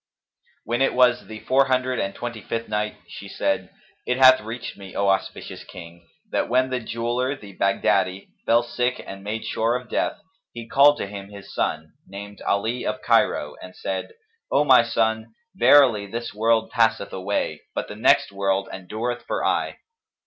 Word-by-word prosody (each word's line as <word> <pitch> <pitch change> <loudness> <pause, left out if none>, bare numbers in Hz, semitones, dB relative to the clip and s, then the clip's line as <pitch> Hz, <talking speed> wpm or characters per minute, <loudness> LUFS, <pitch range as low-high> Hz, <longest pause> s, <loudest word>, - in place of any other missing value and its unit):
When 120 +2 -1
it 135 - +2
was 125 -1 +3
the 110 -1 -9
Four 135 +1 +3
Hundred 130 -1 0
and 100 0 -2
Twenty 120 -2 -6
fifth 115 +4 -4
Night, 105 0 -2
She - - -9
said, - - -1 0.4
it 125 - +1
hath 130 -1 +7
reached 115 +3 -6
me, 95 -2 -11
O 100 0 +2
auspicious 95 0 -2
King, 85 -1 -12 0.2
that - - 0
when 130 +2 +2
the 130 - 0
Jeweller, 120 +3 -2
the 100 -7 -13
Baghdadi, 95 -1 +1 0.2
fell 115 +1 +4
sick 120 +1 -1
and 95 0 -9
made 110 +2 -4
sure 115 +2 0
of 125 -1 -5
death, - - 0 0.4
he 115 -1 -8
called 145 +3 +5
to - - -3
him 100 0 -8
his 100 -1 -11
son, 80 0 -2
named 100 +1 -9
Ali 110 +5 0
of - - -3
Cairo, - - +2
and - - -11
said, 460 0 -4 0.4
"O 145 - +4
my 130 -4 +7
son, 110 -1 -1 0.2
verily 120 -5 +5
this 115 +3 -5
world 110 +1 +1
passeth 115 -3 +1
away; 95 +2 -2
but - - -2
the - - -8
next - - +3
world 100 0 -1
endureth 110 +6 -4
for - - -1
aye. - - 0
115 Hz, 175 wpm, -23 LUFS, 100-125 Hz, 0.4 s, hath